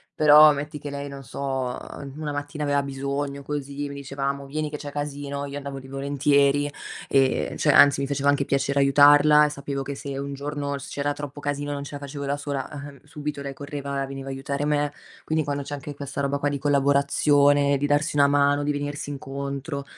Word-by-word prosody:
Però, 150 0 +8
metti 145 +1 -5
che 145 0 -7
lei 140 0 -5
non 140 0 -9
so, 135 -1 -3 0.3
ehm, 140 -1 -8
una 155 -1 -3
mattina 145 +1 -4
aveva 145 -1 +1
bisogno, 140 +1 -3
così 145 0 -4
mi 140 - -7
diceva: 140 0 -5
"Amo 140 0 -2
vieni 150 +2 -3
che 150 - -5
c'è 145 -1 -7
casino", 145 -1 -4
io 140 0 -6
andavo 140 -1 -6
lì 135 - -12
volentieri, 140 +1 +2 0.4
e 135 -1 +2
cioè 150 - +3
anzi 145 -1 +7
mi - - 0
faceva 140 0 +1
anche 145 -1 +2
piacere 140 +1 0
aiutarla 145 +2 +6
e 150 - 0
sapevo 140 -1 -4
che 140 +1 -5
se, 140 0 -6
un 140 0 -4
giorno 140 0 -3
s 140 - -9
c'era 145 0 -1
troppo 145 0 -7
casino 145 0 -3
non 140 0 -4
ce 140 - -8
la 145 - -6
facevo 140 0 -6
da 140 +1 -1
sola, 140 -2 -4
ehm, 140 -2 -9
subito 150 -1 -5
lei 140 0 -5
correva 140 -1 -4
e - - -2
veniva 135 0 -7
a - - -3
aiutare 140 +2 -3
me. 145 -1 0 0.3
Quindi, 155 0 0
quando 145 -1 -3
c'è 145 - -7
anche 145 0 -6
questa 140 0 -5
roba 140 0 0
qua 145 0 0
di 140 - -3
collaborazione, 140 0 +3
di 145 - 0
darsi 145 +2 +1
una 140 -1 +5
mano, 145 0 +3
di 145 - 0
venirsi 145 0 -4
incontro, 140 +1 -5
140 Hz, 215 wpm, -24 LUFS, 140-145 Hz, 0.4 s, Però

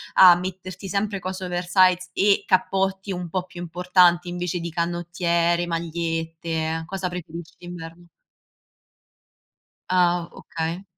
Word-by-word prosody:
a 180 -2 +9
metterti 185 +1 -6
sempre 200 +2 -1
cose 185 0 -5
oversize 180 +1 +2
e 200 0 +3
cappotti 195 +1 +1
un 180 -2 -4
po' 185 +2 -2
più 175 -1 -10
importanti, 175 0 +3
invece 175 0 -3
di 170 0 -4
canottiere, 170 +1 -2 0.6
magliette, 165 -1 -2
cosa 190 +1 -3
preferisci 170 -2 -8
d'inverno? 175 -1 -10 1.8
Ah 175 -1 +2
okay. 165 +3 -5
175 Hz, 110 wpm, -24 LUFS, 170-185 Hz, 1.8 s, a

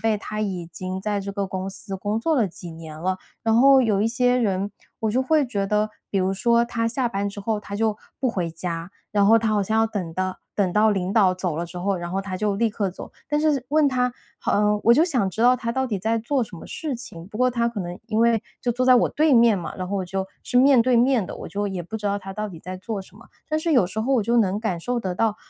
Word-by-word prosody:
辈， 225 -1 +2
他 215 +1 -5
已 185 -5 -3
经 185 +2 -5
在 205 0 -1
这 200 0 -5
个 200 0 -2
公 190 0 -4
司 195 0 -7
工 205 +3 -2
作 315 +8 +1
了 235 -8 +2
几 175 0 -9
年 160 -1 -9
了， 185 +3 -1 0.2
然 225 -1 +2
后 270 +3 +7
有 210 -4 +2
一 220 - +2
些 245 +1 +2
人 200 -4 0 0.3
我 220 -1 0
就 255 +4 +1
会 295 0 +2
觉 200 -5 -1
得， 210 +1 +1 0.2
比 200 - +1
如 190 0 +1
说 235 +4 +3
他 230 -1 -1
下 245 +2 0
班 200 -2 -2
之 200 - -9
后 210 +1 -1
他 200 - -6
就 215 -1 +1 0.2
不 260 - +1
回 180 -6 -2
家， 165 +1 -5 0.2
然 205 -1 +3
后 225 +3 +6
他 225 0 -1
好 210 -1 +2
像 220 +3 0
要 225 - +3
等 195 -7 -4
到 185 +1 -2 0.2
等 190 -4 +1
到 215 +2 +4
领 190 -2 -1
导 200 -5 +4
走 180 -3 -3
了 170 - -2
之 175 +1 -8
后， 195 +2 0
然 175 -1 -5
后 195 - -1
他 190 -1 -5
就 205 0 0
立 230 +2 +2
刻 205 -2 -2
走。 180 - -10 0.2
但 295 +1 +1
是 300 -5 +1
问 300 +1 +4
他 250 -2 0 0.3
啊， 210 0 +2
我 235 - +6
就 305 +7 +5
想 250 - 0
知 200 - -6
道 250 +1 +6
他 230 -2 -3
到 265 +2 0
底 220 -5 -2
在 225 +4 0
做 255 +4 0
什 210 -5 -7
么 - - -10
事 300 -5 -4
情， 175 -8 -9
不 210 +2 -8
过 255 - +4
他 235 -1 +1
可 235 -2 -6
能 175 0 -6
因 215 - 0
为 230 -1 +3 0.2
就 245 - 0
坐 250 +2 0
在 255 0 +7
我 240 - +3
对 310 0 +2
面 230 -3 +6
嘛， 175 -4 -5
然 185 -1 -4
后 200 - -1
我 190 - -1
就 190 +1 -3 0.2
是 245 - -2
面 260 -1 +6
对 250 0 +3
面 245 -2 +3
的， - - -7
我 - - -8
就 205 0 -2
也 190 -2 -4
不 200 +6 -6
知 210 - -10
道 200 0 0
他 195 -1 -8
到 215 +2 -4
底 175 -5 -10
在 185 +2 -6
做 200 +2 -4
什 190 +1 -14
么， 230 - -16 0.2
但 310 - +1
是 325 +1 0
有 245 -10 +4
时 195 +4 -4
候 255 +5 0
我 240 - +3
就 235 +3 +1
能 200 -3 +2
感 215 -6 -1
受 245 +8 -2
得 185 -4 -3
到， 215 +2 +1
210 Hz, 305 characters per minute, -23 LUFS, 190-235 Hz, 0.3 s, 后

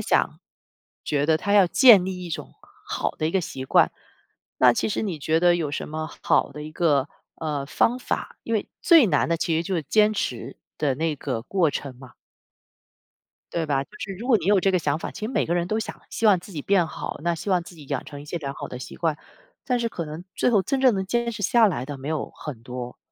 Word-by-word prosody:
想 - - +1 0.7
觉 145 -1 0
得 160 0 +4
他 200 +5 -2
要 200 -2 +6
建 210 0 +7
立 185 -1 -5
一 170 - -7
种 - - -6 0.3
好 - - -1
的 155 - 0
一 - - 0
个 190 - +2
习 135 -6 -6
惯。 - - +4 0.7
那 125 -1 +7
其 120 - -1
实 210 - -1
你 190 -7 -3
觉 160 +3 +1
得 175 0 +5
有 160 -4 -2
什 - - -4
么 155 +1 -4
好 - - +2
的 150 +1 -7
一 155 - -7
个， 150 -4 +1 0.3
呃， 150 -3 -3
方 240 - +2
法？ - - -4
因 230 - -1
为 210 - -1
最 330 -8 +7
难 150 -7 +2
的 170 - +2
其 165 0 0
实 165 - -1
就 190 - -2
是 165 - 0
坚 215 +8 +3
持 125 - -3 0.2
的 145 -3 +1
那 155 +2 -1
个 115 -4 -3
过 175 +5 +1
程 140 -3 -5
嘛。 130 -1 -13 1.4
对 170 - -1
吧， 140 -2 +1
就 - - -37
是 195 - -5
如 235 - -6
果 255 -4 +5
你 170 - -7
有 200 -1 +5
这 195 - +3
个 185 - +2
想 150 -2 0
法 - - -5
其 - - -10
实 - - -2
每 - - +1
个 170 - 0
人 175 -1 0
都 215 - 0
想 225 - -6
希 225 - 0
望 200 -3 +6
自 180 +3 -12
己 155 - -4
变 190 -4 +3
好， - - -6
那 170 +1 +1
希 165 - -7
望 180 -2 +3
自 175 - -13
己 150 -4 -13
养 - - -3
成 145 -1 -9
一 145 - -10
些 170 - -5
良 140 -3 -4
好 - - -7
的 125 - -7
习 125 - -8
惯， 160 -3 0 0.5
但 250 -2 0
是 235 - 0
可 170 -6 -5
能 155 +2 -7
最 - - +2
后 205 -5 +4
真 270 +4 -1
正 255 -4 +5
能 190 -1 -2
坚 235 +3 0
持 210 -2 -6
下 225 +3 +5
来 155 -10 -2
的 145 - -5
没 135 +2 -7
有 155 -2 -2
很 130 -7 -8
多。 125 0 -7
170 Hz, 275 characters per minute, -24 LUFS, 145-200 Hz, 1.4 s, 建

